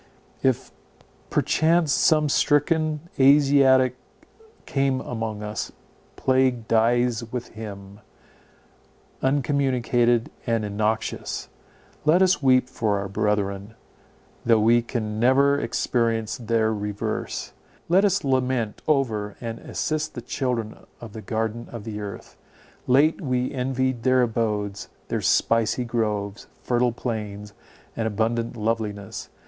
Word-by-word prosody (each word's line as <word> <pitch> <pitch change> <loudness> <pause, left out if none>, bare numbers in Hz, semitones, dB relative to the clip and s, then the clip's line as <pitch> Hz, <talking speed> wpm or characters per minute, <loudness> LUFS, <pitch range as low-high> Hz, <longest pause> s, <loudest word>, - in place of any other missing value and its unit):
If 130 -2 0 0.6
perchance 160 0 +2
some 155 -1 +3
stricken 155 +2 +2 0.2
Asiatic 135 -2 +5 0.7
come 135 -1 0
among 110 -4 -4
us, 105 0 -4 0.4
plague 130 -3 +1
dies 120 +1 +2
with 125 -1 -4
him, 100 -2 -9 1.2
uncommunicated 125 -3 +1 0.2
and 115 -2 +1
innoxious. 110 +2 -2 0.5
Let 165 +5 +5
us 185 -4 +3
weep 130 -2 +4
for 110 -5 -1
our 100 0 -3
brethren, 100 +1 -1 0.7
though 115 -2 +4
we 115 +2 +4
can 110 -3 -4
never 140 +4 +4
experience 115 -5 0
their 115 -2 0
reverse. 105 -1 -4 0.3
Let 185 +4 +4
us 195 -1 +2
lament 130 -5 0
over 110 -9 0
and 115 -1 -5
assist 155 0 -3
the 120 - -6
children 120 -4 -2 0.2
of 115 -3 -10
the 110 - -7
garden 110 +3 -3
of 115 -3 -7
the 105 -1 -5
earth. 100 -1 -8 0.5
Late 145 +8 +4
we 125 -4 -1
envied 130 -1 -1
their 130 +1 +3
abodes, 105 -3 -2 0.2
their - - -1
spicy 115 +2 +2
groves, 105 -3 -2 0.2
fertile 120 0 +2
plains, 105 -4 -5 0.4
and 115 -1 -1
abundant 115 +2 -1
loveliness. 105 -2 -3
120 Hz, 110 wpm, -24 LUFS, 110-130 Hz, 1.2 s, Asiatic